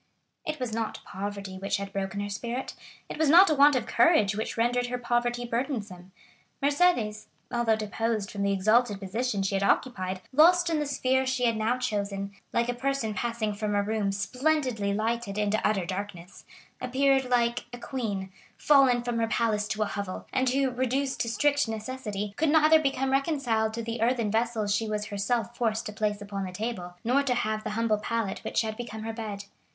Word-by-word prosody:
It 305 -1 -3
was 250 -3 -3
not 225 -1 -3
poverty 195 -1 -6
which 195 +1 -1
had 200 0 -6
broken 195 0 -3
her 205 - -3
spirit; 235 +5 -4 0.3
it - - -7
was 315 -2 +3
not 355 +3 +8
a - - +5
want 290 0 +6
of 255 - 0
courage 230 - +4
which 220 +2 -3
rendered 245 +1 +1
her 250 0 -2
poverty 240 0 0
burdensome. 220 -7 -4 0.5
Mercédès, 280 -8 +2 0.2
although 235 -2 +2
deposed 215 -1 -2
from 200 - -5
the 200 0 +2
exalted 210 +2 +2
position 205 +2 -2
she 195 - -1
had 195 - +1
occupied, 185 -4 0
lost 345 +4 +5
in 315 - +1
the 295 - -1
sphere 265 -1 +1
she 260 -1 0
had 230 -1 +2
now 220 +3 0
chosen, 200 -5 -2 0.2
like 235 0 +1
a 245 - 0
person 255 -3 -1
passing 220 +1 -2
from 210 0 -2
a 205 - +2
room 210 -1 0
splendidly 250 0 0
lighted 220 0 -1
into 210 +1 +1
utter 200 -4 +1
darkness, 185 -1 -6 0.4
appeared 270 +1 +2
like 240 -1 +1
a 245 - -7
queen, 210 -7 -4 0.3
fallen 265 -5 +4
from 240 -1 -2
her 225 - +1
palace 220 -2 0
to 215 0 -1
a - - -1
hovel, 200 -2 -5
and 260 0 +2
who, 265 0 +1
reduced 260 +2 -1
to 230 - 0
strict 285 +3 +2
necessity, 215 -2 -4
could 315 0 +2
neither 315 +1 +6
become 270 -2 0
reconciled 270 -6 +1
to 230 +1 -4
the 230 0 -4
earthen 230 -2 +1
vessels 220 -2 0
she 220 +1 -1
was 210 0 -2
herself 230 +4 -2
forced 230 -1 -1
to 210 - -5
place 210 -1 -1
upon 200 -1 -4
the 185 - -5
table, 180 -3 -5
nor 255 +5 +3
to 275 -3 +1 0.3
the - - -3
humble 215 0 +1
pallet 225 -2 -2
which - - 0
had 220 -1 -3
become 220 -2 -6
her 225 0 -4
bed. 215 -3 -5
230 Hz, 190 wpm, -28 LUFS, 205-255 Hz, 0.5 s, not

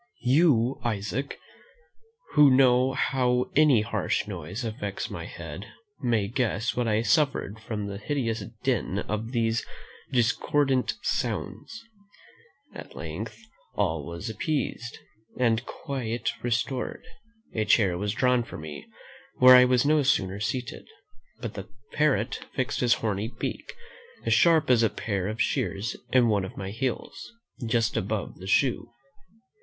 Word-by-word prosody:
You, 130 -2 +3
Isaac, 115 +4 -2 0.9
who 150 -1 +7
know 130 0 +4
how 125 -2 +1
any 145 -6 +5
harsh 105 - -1
noise 95 +4 -5
affects 105 -3 -4
my - - -6
head, 85 +4 -8 0.3
may 115 -6 +1
guess 115 -1 -1
what 125 -1 0
I 110 0 +2
suffered 135 -7 +1
from 110 -2 -4
the 100 -1 -5
hideous 115 -3 -2 0.2
din 120 -7 0
of 105 +3 -3
these 115 -2 0 0.5
discordant 130 +2 +1
sounds. 225 - -3 0.9
At - - -10
length 100 +8 -6 0.4
all 80 -7 0
was 85 +5 -6
appeased, 140 -3 -3 0.4
and 115 -2 +2
quiet 125 -5 -3
restored: 120 +2 -2 0.5
a 110 - 0
chair 105 -3 +3
was 100 +3 -2
drawn 125 -1 +2
for 115 - -8
me; 75 -2 -8 0.5
where 130 0 +9
I 125 0 +8
was 125 +1 +3
no 150 +1 +4
sooner 100 -8 +1
seated, 125 +4 -4 0.5
but 115 -4 -4
the 95 -1 -8 0.2
parrot 135 -7 +1 0.2
fixed 130 -3 -1
his 120 -1 +4
horny 105 -1 -2
beak, 125 - -6 0.5
as - - +3
sharp 165 -5 +4
as 120 -2 +5
a 115 - +4
pair 100 -2 -3
of 110 +2 -4
shears, 110 +4 -1 0.2
in 125 -2 +5
one 105 -3 +2
of 95 - -8
my 95 0 -5
heels, 130 - -4 0.3
just 115 -1 +1
above 100 0 -3
the 95 - -8
shoe. 120 +2 +2
115 Hz, 135 wpm, -27 LUFS, 105-130 Hz, 0.9 s, where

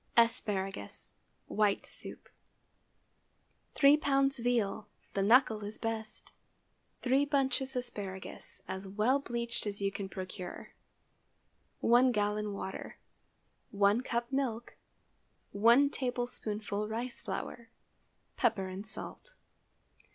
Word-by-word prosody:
ASPARAGUS 200 - +1 0.3
(White 210 -2 +1
soup.) - - -8 1.5
3 285 +1 +7
lbs. 275 -2 +2
veal. 225 -4 +1 0.3
The 195 - 0
knuckle 220 0 +5
is 205 +1 -4
best. 225 -1 -4 0.7
3 265 +2 +4
bunches 270 -2 0
asparagus, 205 -6 -5
as 190 +1 -5
well 215 +8 +2
bleached 235 -4 -2
as 205 -1 -3
you 195 0 0
can 195 0 -5
procure. 185 -1 -7 1.1
1 245 +2 +5
gallon 210 0 0
water. 190 -1 -6 0.7
1 200 +3 +3
cup 235 0 -2
milk. 240 -4 -1 0.8
1 235 +7 +5
tablespoonful 220 -5 -2
rice 235 +3 -4
flour. 230 +2 -5 0.7
Pepper 215 -6 +1
and 190 +3 -6
salt. - - -8
225 Hz, 100 wpm, -32 LUFS, 200-250 Hz, 1.5 s, 3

